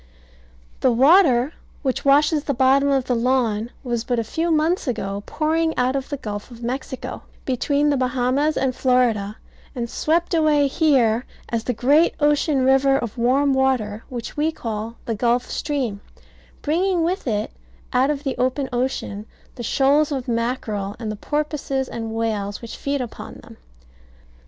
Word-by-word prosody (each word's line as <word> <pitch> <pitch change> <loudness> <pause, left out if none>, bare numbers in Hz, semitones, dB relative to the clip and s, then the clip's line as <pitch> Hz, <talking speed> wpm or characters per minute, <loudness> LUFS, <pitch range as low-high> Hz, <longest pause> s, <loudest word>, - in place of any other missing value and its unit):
The 260 - +3
water 270 +1 +5 0.3
which 260 -2 -1
washes 290 +2 +4
the 280 - -1
bottom 270 +3 +4
of 270 -2 +1
the 255 - 0
lawn 235 -2 +1
was 240 -3 -2
but 245 0 -1
a 230 - +1
few 325 +9 -2
months 320 +1 +1
ago 200 -4 -2
pouring 320 +1 0
out 255 +2 +1
of 270 -1 -3
the 285 - -3
Gulf 210 -4 -6
of 235 -1 -12
Mexico, 260 +1 -4 0.2
between 285 +3 +1
the 285 - +1
Bahamas 255 +4 +1
and 260 -2 0
Florida, 235 -6 +1 0.4
and 240 -2 -2
swept 330 +8 0
away 305 -3 +3
here 265 -6 +2 0.2
as 230 -1 -2
the 250 - 0
great 285 +8 +3
ocean 295 -2 +2
river 270 +1 +4
of 235 -5 -4
warm 270 +4 +3
water 250 -5 0
which 240 -2 -6
we 305 +2 +1
call 225 -4 -5
the 230 - -1
Gulf 240 +3 +1
Stream, 260 -9 -2 0.6
bringing 345 +3 +1
with 360 -1 -1
it 215 -1 -1 0.4
out 255 +2 +3
of 290 -1 -2
the 270 -3 -2
open 260 +2 0
ocean 240 -4 -2 0.3
the 245 - -8
shoals 280 +5 +2
of 265 -3 -3
mackerel, 230 -4 -2
and 225 -2 -4
the - - -4
porpoises 290 +1 -2
and 225 -1 -5
whales 210 -3 -2
which 235 - -8
feed 280 -1 -2
upon 240 -3 -7
them. - - -14
260 Hz, 160 wpm, -22 LUFS, 235-290 Hz, 0.6 s, water